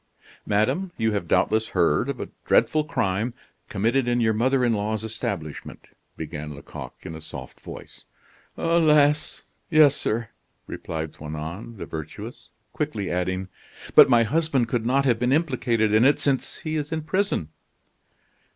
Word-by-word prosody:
"Madame, 110 - +1
you 110 -1 +1
have 100 -5 -2
doubtless 110 +6 +2
heard 85 - +3
of 140 - -3
a - - -5
dreadful 155 -1 +3
crime, 110 -4 -1 0.3
committed 115 +6 +1
in 120 0 +2
your 110 -2 +3
mother 130 +3 +2
in 120 - +2
law's 105 +1 -1
establishment," 90 -9 -5 0.3
began 75 -2 -6
Lecoq 70 - -9
in - - -7
a 80 - -8
soft - - -10
voice. - - -11 0.5
"Alas! 155 -3 +3 0.3
yes, 155 -4 +6
sir," 115 +1 -2 0.4
replied 80 -1 -5
Toinon 80 +9 -7
the - - -6
Virtuous, 80 - -8 0.2
quickly 130 -11 -2
adding: 95 +1 -1 0.5
"But - - +9
my 120 -2 +6
husband 140 -1 +1
could 115 -1 -1
not 135 +2 +2
have 120 -4 +2
been 125 +1 +1
implicated 125 -8 +1
in 110 +2 +5
it, 140 +3 +5
since 135 -2 -1
he 155 0 -3
is 150 0 -3
in 160 -1 -2
prison." 185 - -1
115 Hz, 150 wpm, -24 LUFS, 95-140 Hz, 0.5 s, But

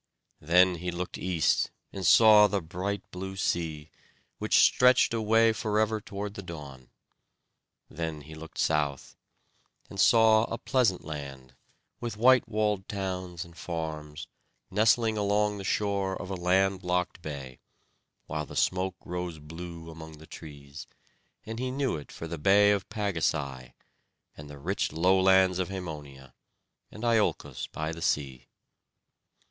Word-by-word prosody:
Then 90 +3 +4
he 90 +2 -4
looked 90 +1 -5
east 90 -4 +1 0.2
and 95 - -5
saw 105 +3 +7
the 100 -1 -1
bright 95 +4 -4
blue 95 +1 -6
sea, 80 -5 -2 0.5
which - - +2
stretched 125 -1 +5
away 115 0 +3
forever 110 0 0
toward 100 0 -6
the 100 - -7
dawn. 70 -8 -10 1.0
Then 80 -1 -5
he 80 +2 -12
looked 80 0 -11
south, 75 -3 -1 0.8
and 100 - -8
saw 110 +1 +5
a 115 - -4
pleasant 120 -10 +1
land, 70 -4 -8 0.5
with 115 -3 -5
white 130 +2 +5
walled 105 -2 0
towns 90 -4 -4
and 85 -1 -16
farms, 80 -2 -5 0.5
nestling 110 +1 +3
along 105 0 +1
the - - -6
shore 100 -1 -1
of 95 - -7
a - - -2
land 95 +2 +1
locked 90 -1 -1
bay, 70 -5 -7 0.7
while 75 -1 -4
the - - -10
smoke 95 0 0
rose 90 -2 -4
blue 80 +2 -9
among 80 -1 -11
the 80 - -14
trees; 75 -3 -11 0.6
and 110 +1 -6
he 130 0 -2
knew 135 -3 -1
it 75 -2 -9
for - - -8
the 85 -1 -6
bay 100 +5 +5
of 100 -2 -1
Pagasai, 75 - -2 0.6
and 75 0 -11
the 70 - -10
rich 90 +8 -2
lowlands 95 +1 +4
of 95 - -1
Hæmonia, 75 -8 -8 0.6
and 110 - -11
Iolcos 115 -3 0
by 80 +1 -3
the 85 0 -8
sea. 65 -6 -1
90 Hz, 140 wpm, -28 LUFS, 80-105 Hz, 1.0 s, saw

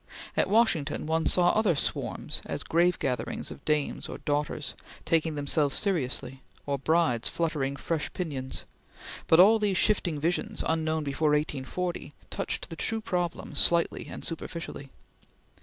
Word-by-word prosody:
At - - +2
Washington, 185 -11 +2
one 160 +1 +1
saw 175 -1 +4
other 215 -6 +2
swarms - - -2
as - - -3
grave 175 +2 +3
gatherings 125 -2 -2
of - - -10
Dames 150 -2 0
or - - -5
Daughters, 145 0 -2 0.3
taking 160 -1 +1
themselves 145 0 +1
seriously, 135 -8 0 0.2
or 140 -1 -1
brides 155 -5 +2
fluttering 150 -5 -1
fresh 155 +2 -2
pinions; 140 -7 -4 0.6
but 160 - +6
all 215 +5 +8
these 205 -3 +1
shifting 180 -7 +1
visions, 170 +4 -1
unknown 160 -1 0
before 150 +2 0
1840, 150 +3 -2 0.2
touched - - -3
the - - -5
true 225 +7 -1
problem 180 -6 -3
slightly 170 -1 +3
and - - -6
superficially. 165 -4 -5
160 Hz, 140 wpm, -28 LUFS, 145-175 Hz, 0.6 s, all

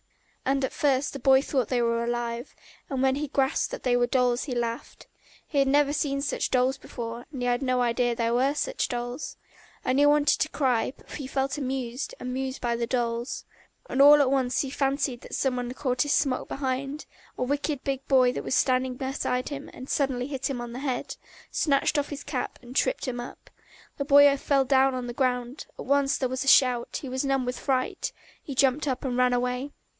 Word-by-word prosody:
And 270 0 +1
at - - -6
first 275 -1 +1
the 275 - -6
boy 265 +1 +5
thought 260 -7 -1
they 250 -2 +1
were 235 0 +1
alive, 240 +1 -3 0.3
and 270 -3 -2
when 265 0 +3
he 295 +1 -2
grasped 270 -1 +1
that - - -6
they 250 -1 +2
were 245 0 +3
dolls 250 -1 +1
he 260 -4 -4
laughed. 235 0 -4 0.4
He 290 - 0
had 275 - +3
never 285 +1 +3
seen 280 -2 -1
such 280 - -1
dolls 255 +1 +2
before, 235 0 -7
and 265 -4 -6
had 245 +1 +1
no 255 -2 +1
idea 240 0 +1
there 230 0 0
were 265 +4 +2
such - - -1
dolls! 245 +3 -4 0.5
And 255 +2 +2
he 290 - +6
wanted 290 0 +4
to 310 - +1
cry, 255 -4 0
but - - -21
he 280 -3 -6
felt 270 +1 -1
amused, 260 -1 -3
amused 260 +1 -3
by 235 -1 -1
the 235 0 -2
dolls. 235 0 -2 0.4
All 285 +2 +7
at 270 -2 +3
once 260 -2 +1
he 270 - -4
fancied 275 -3 -1
that - - -7
some 265 -2 0
one 245 -1 -3
caught 255 -2 -2
at - - +5
his 290 - +2
smock 265 -2 +1
behind: 275 +2 -3 0.3
a - - -1
wicked 285 +1 -2
big 270 -1 -3
boy 255 -2 +5
was 255 - -2
standing 255 0 +2
beside 255 -1 -2
him 285 -1 -6
and 255 - -10
suddenly 265 -4 0
hit 270 -2 -3
him 265 -3 -3
on 240 -1 -6
the 250 - -5
head, 265 -3 -3 0.4
snatched 290 +1 +2
off 290 - -3
his 285 -1 -6
cap 275 -4 -4
and 245 +1 -11
tripped - - +1
him 245 -1 -3
up. 240 - -9 0.5
The 280 - -2
boy 285 0 +7
fell 275 -1 +1
down 265 0 +3
on 250 -1 -3
the 240 - -5
ground, 250 +1 -1
at - - -7
once 280 +1 +2
there 260 - 0
was 260 +1 -2
a - - -7
shout, 250 -4 +4
he - - -5
was 260 +1 -2
numb 270 -2 +1
with 250 0 -3
fright, 260 -2 -1 0.3
he 275 - -7
jumped 275 +3 +2
up 260 0 -2
and 250 -2 -1
ran 250 0 +3
away. 250 +3 -1
260 Hz, 215 wpm, -27 LUFS, 245-275 Hz, 0.5 s, All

